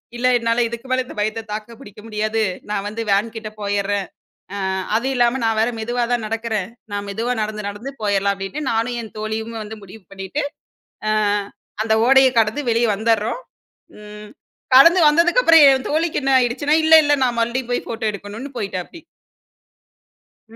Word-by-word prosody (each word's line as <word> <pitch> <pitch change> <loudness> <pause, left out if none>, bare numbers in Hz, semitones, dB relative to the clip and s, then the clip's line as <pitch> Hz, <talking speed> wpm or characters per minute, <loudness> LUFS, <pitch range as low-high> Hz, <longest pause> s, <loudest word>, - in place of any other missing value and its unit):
இல்ல 245 +1 0
"என்னால 230 +1 +1
இதுக்கு 235 +2 -8
மேல 255 0 +1
இந்த - - -11
பயத்த 215 +2 -1
தாக்க 215 0 -8
முடியாது, 215 0 -1 0.3
நான் 205 -1 -2
வந்து 215 +2 -5
வேன்கிட்ட 220 +2 -1
போயிறேன்." 200 -1 -1 0.5
அ - - -4 0.4
அதுவும் 260 +4 0
இல்லாம 245 +1 +2
நான் 225 -1 +1
வேற 225 +2 +2
மெதுவாதான் 240 0 -1
நடக்குறேன், 220 -3 -3 0.2
நான் 205 0 -3
மெதுவா 230 +5 -2
நடந்து 215 -1 -4
நடந்து 205 +7 -7
போயிர்லாம் 200 -1 +1
அப்டின்னு 195 +11 -5
நானும் 230 +2 -1
என் 220 - -11
தோழியும் 220 +1 -4
வந்து 215 +1 -8
முடிவு 200 +2 -13
பண்ணிட்டு, 195 +10 -4 0.7
அ - - +1 0.7
அந்த 220 0 +1
ஓடைய 265 0 +6
கடந்து 225 +6 +1
வெளியே 230 0 +2
வந்தர்றோம். 220 - 0 0.6
ம் 210 0 -11 0.5
கடந்து 335 +7 +8
வந்ததுக்கப்புறம் 330 +2 +5
என் 265 -1 +1
தோழிக்கு 320 +2 0
என்ன 270 0 0
ஆயிடுச்சுன்னா, 265 +5 +1
"இல்ல 320 0 +7
இல்ல 290 0 +3
நான் 240 -2 0
மறுபடியும் 235 +2 -1
போய் 245 - -2
போட்டோ 225 0 -4
எடுக்கணும்னு" 205 +7 -8
போயிட்டாப்டி. 195 - -5 1.5
ம். - - -12
225 Hz, 155 wpm, -20 LUFS, 210-255 Hz, 1.5 s, கடந்து